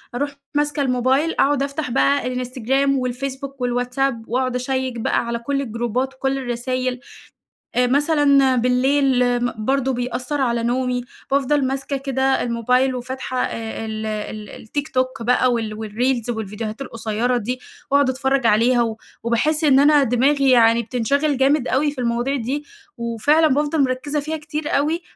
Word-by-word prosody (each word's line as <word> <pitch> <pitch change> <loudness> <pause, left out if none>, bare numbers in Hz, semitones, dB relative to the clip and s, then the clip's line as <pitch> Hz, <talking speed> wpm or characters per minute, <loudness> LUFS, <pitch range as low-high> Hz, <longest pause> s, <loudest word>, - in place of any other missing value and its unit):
أروح 285 +2 -1 0.2
ماسكة 295 0 0
الموبايل 265 +4 +1
أقعد 280 0 +3
أفتح 280 -1 -3
بقى 270 -1 +1
Instagram 265 +2 0
والFacebook 270 +1 -2
والWhatsApp 250 +2 0
وأقعد 255 +1 -1
أشيّك 255 -1 -2
بقى 235 - 0
على 235 0 -2
كُل 275 +3 -1
الجروبات 240 +2 -2
وكُل 270 +1 -1
الرسايل، 255 0 -2 0.8
آآ 250 0 +3
مثلًا 280 -1 +3
بالليل 250 0 +2
م 245 - 0
برضو 270 -1 +1
بيأثّر 250 +3 -2
على 235 -2 0
نومي، 250 0 0 0.3
بافضل 280 0 +2
ماسكة 270 +1 -2
كده 270 0 0
الموبايل 250 +2 +1
وفاتحة 255 0 -3
ال 220 -1 -5
ال 215 0 -6
الTikTok 260 -2 -2
بقى 250 +1 +3
وال 225 -2 -2
والريلز 230 +3 -1
والفيديوهات 220 +1 -4
القصيّرة 230 0 -1
دي، 250 +3 -3 0.3
وأقعد 280 -2 +4
أتفرج 265 0 0
عليها 235 +3 +4
و 225 -1 -1 0.3
وباحس 295 +7 +1
إن 275 -2 +5
أنا 290 0 +5
دماغي 270 +3 +2
يعني 230 -1 +5
بتنشغل 270 +5 0
جامد 270 0 +2
أوي 290 +3 +1
في 260 -3 -6
المواضيع 240 +3 0
دي، 275 +4 -3 0.3
وفعلًا 235 +7 +2
بافضل 295 +1 +1
مركّزة 270 +3 -1
فيها 310 +2 -3
كتير 300 0 -5
أوي، 315 +5 0
255 Hz, 145 wpm, -21 LUFS, 240-275 Hz, 0.8 s, إن